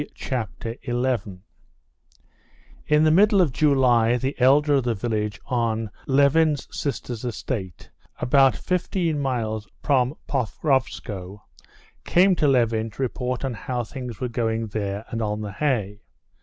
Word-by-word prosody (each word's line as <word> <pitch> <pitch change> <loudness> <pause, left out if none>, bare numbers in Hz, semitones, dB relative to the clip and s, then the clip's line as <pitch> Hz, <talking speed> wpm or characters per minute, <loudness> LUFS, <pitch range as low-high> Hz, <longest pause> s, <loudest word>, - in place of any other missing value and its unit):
Chapter 115 -2 -4
11 120 -7 -2 1.4
In 150 0 +4
the 155 - +5
middle 200 +4 +5
of 170 -7 +3
July 125 -6 +3
the 130 +3 -2
elder 145 +3 +5
of 135 -2 +3
the 120 -1 0
village 105 -1 -2
on 115 -3 -1 0.2
Levin's 145 +2 +3
sister's 125 -5 -4
estate, 110 -6 -5 0.3
about 135 +1 +4
fifteen 175 -3 -1
miles 110 -6 -2 0.2
from 135 -1 +2
Pokrovskoe, 110 - -2 0.6
came 185 +2 +4
to 150 - +2
Levin 115 -4 +2
to 110 - -9
report 125 +1 -2
on 130 - -2
how 120 +2 -3
things 120 -2 -7
were 125 - -1
going 115 -1 -1
there 100 0 -3
and 115 - -3
on 105 0 -2
the 105 -1 -5
hay. 105 -5 -1
125 Hz, 130 wpm, -24 LUFS, 110-140 Hz, 1.4 s, the